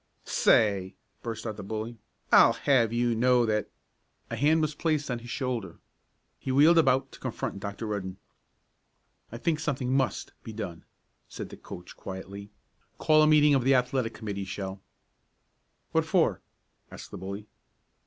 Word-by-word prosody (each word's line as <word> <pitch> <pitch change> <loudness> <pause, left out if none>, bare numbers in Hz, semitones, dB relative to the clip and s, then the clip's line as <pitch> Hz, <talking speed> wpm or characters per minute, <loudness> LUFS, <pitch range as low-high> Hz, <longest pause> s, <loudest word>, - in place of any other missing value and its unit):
"Say!" 100 -3 +3 0.3
burst 115 -1 -5
out 110 -2 -4
the 100 - -7
bully. 110 +3 -5 0.3
"I'll - - +7
have 125 -6 +2
you 120 0 +1
know 125 +1 +3
that 105 -2 0 0.3
" - - -43
A - - -1
hand 155 +4 +3
was 155 -1 -1
placed 150 -3 -1
on 120 - -2
his 120 +1 -11
shoulder. 120 - -3 0.6
He 130 - -3
wheeled 155 +5 +6
about 135 -3 +2
to - - -13
confront 120 -5 -4
Dr. 100 +2 -5
Rudden. 95 -3 -4 1.1
"I 115 - -6
think 155 +4 0
something 135 -4 -1
must 135 -1 -1
be 110 - -8
done," 100 -6 -6 0.4
said - - -7
the - - -9
coach 90 - -10
quietly. 100 +1 -8 0.5
"Call 155 0 +4
a 155 - +5
meeting 150 -1 +6
of 135 -3 +3
the 135 +2 +4
Athletic 125 -2 0
Committee, 100 -3 -4
Shell." 95 0 -6 1.1
"What - - +2
for?" - - +2 0.5
asked - - -11
the - - -7
bully. 100 +2 -6
115 Hz, 160 wpm, -28 LUFS, 100-135 Hz, 1.1 s, I'll